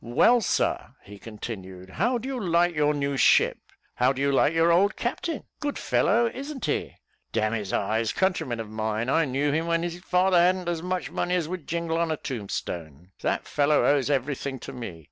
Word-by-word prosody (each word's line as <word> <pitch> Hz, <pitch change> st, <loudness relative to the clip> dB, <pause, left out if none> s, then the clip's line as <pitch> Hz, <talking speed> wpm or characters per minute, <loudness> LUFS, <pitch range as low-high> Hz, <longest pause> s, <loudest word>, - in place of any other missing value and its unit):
"Well, 185 Hz, -, +4 dB
sir," -, -, -1 dB
he 100 Hz, 0 st, -12 dB
continued, 95 Hz, -4 st, -8 dB
"how 240 Hz, -, +1 dB
do 235 Hz, +3 st, -6 dB
you 270 Hz, -2 st, -3 dB
like 175 Hz, -3 st, +2 dB
your 150 Hz, -1 st, +2 dB
new 140 Hz, -1 st, -1 dB
ship -, -, +4 dB, 0.3 s
how 125 Hz, +1 st, +3 dB
do 135 Hz, -, -5 dB
you 140 Hz, 0 st, +2 dB
like 140 Hz, +2 st, +3 dB
your 165 Hz, +1 st, +3 dB
old 195 Hz, +5 st, +3 dB
captain? 295 Hz, +6 st, -3 dB, 0.2 s
good 290 Hz, -1 st, -3 dB
fellow, 235 Hz, +4 st, +2 dB
isn't 275 Hz, 0 st, -5 dB
he? -, -, -2 dB, 0.4 s
d 115 Hz, -, 0 dB
n 110 Hz, +1 st, 0 dB
his 105 Hz, -4 st, -3 dB
eyes 110 Hz, +2 st, 0 dB
countryman 180 Hz, -11 st, 0 dB
of 110 Hz, -, -5 dB
mine 110 Hz, +2 st, -2 dB
I 165 Hz, +3 st, +3 dB
knew 140 Hz, +2 st, 0 dB
him 160 Hz, +3 st, 0 dB
when 165 Hz, 0 st, +1 dB
his 175 Hz, 0 st, -4 dB
father 180 Hz, 0 st, +3 dB
hadn't 180 Hz, +1 st, +2 dB
as 170 Hz, -2 st, -1 dB
much 180 Hz, +1 st, -3 dB
money 180 Hz, +1 st, -1 dB
as 170 Hz, -4 st, 0 dB
would 175 Hz, -3 st, -6 dB
jingle 165 Hz, 0 st, -1 dB
on 170 Hz, -1 st, +1 dB
a 155 Hz, -, -1 dB
tombstone. 90 Hz, -, -6 dB
That -, -, -1 dB
fellow 145 Hz, +1 st, +2 dB
owes 145 Hz, -1 st, +2 dB
every 140 Hz, 0 st, +1 dB
thing 135 Hz, 0 st, -5 dB
to -, -, -8 dB
me. 115 Hz, -10 st, -7 dB
150 Hz, 205 wpm, -26 LUFS, 115-180 Hz, 0.4 s, Well